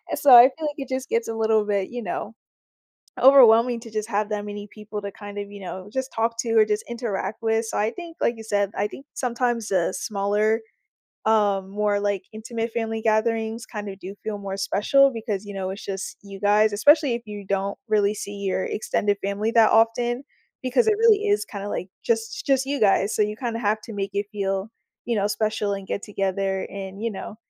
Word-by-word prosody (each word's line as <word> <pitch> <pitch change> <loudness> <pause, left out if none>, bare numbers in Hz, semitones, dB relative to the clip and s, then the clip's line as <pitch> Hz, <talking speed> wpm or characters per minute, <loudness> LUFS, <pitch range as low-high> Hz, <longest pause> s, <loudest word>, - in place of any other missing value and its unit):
So, 280 - +4
I 240 - +12
feel 305 +4 +1
like 295 - -4
it 270 -2 -6
just 260 +1 -3
gets 230 0 0
a 225 - -3
little 220 -1 +2
bit, 200 -2 -1
you 245 0 -5
know, 205 +4 -4 0.9
overwhelming 245 -3 +7
to 230 - -11
just 215 +1 -3
have 210 0 0
that 210 -1 -3
many 205 0 -7
people 210 0 -7
to 200 0 -5
kind 205 0 -10
of, 200 0 -6
you 200 -1 -10
know, 190 +2 -7
just 265 0 -2
talk 230 +1 0
to 230 -1 -2
or 215 - +7
just 210 0 -1
interact 220 -4 -3
with. 225 0 +1
So, - - -4
I 215 +2 +2
think 340 +1 -9
like 235 - +2
you 225 - -9
said, 205 -2 0
I 205 - 0
think 270 +6 -11
sometimes 240 -3 -1
a 185 -1 +1
smaller, 210 +3 0 0.6
um, 205 -3 +2
more, 205 0 0
like, 205 -2 -1
intimate 225 +1 -4
family 225 -1 -2
gatherings 225 +1 0
kind 210 -2 -6
of 195 0 -9
do 190 +2 -8
feel 215 -1 -3
more 195 -1 -5
special 275 +8 +3
because, 215 -3 -4
you 205 - -7
know, 190 -1 -3
it's 200 - -8
just 195 -1 -5
you 195 -1 -10
guys, 210 +1 +4
especially 290 +4 +5
if 235 - -5
you 205 -2 -8
don't 195 0 -1
really 210 -1 +2
see 205 0 -6
your 190 -1 -1
extended 205 -1 0
family 205 +3 -1
that 225 -2 +5
often 240 +3 +2 0.4
because 260 - +2
it 430 - +4
really 430 -2 +4
is, 410 0 +2
kind 200 -2 -7
of, - - -4
like, 180 - -3 0.2
just 225 -1 -1
just 270 -1 +2
you 280 0 -2
guys, 200 0 +3
so - - +2
you 210 0 0
kind 235 -3 -3
of - - -6
have 215 +1 +1
to 225 - -9
make 195 -1 -3
it 200 0 -1
feel, 195 0 -2 0.4
you 235 - 0
know, 200 0 +1
special, 215 -1 -1
and 195 -1 -6
get 200 - -3
together, 195 -1 -2
and, 195 +1 -7
you 230 - 0
know, 205 +1 -7
215 Hz, 220 wpm, -24 LUFS, 200-230 Hz, 0.9 s, I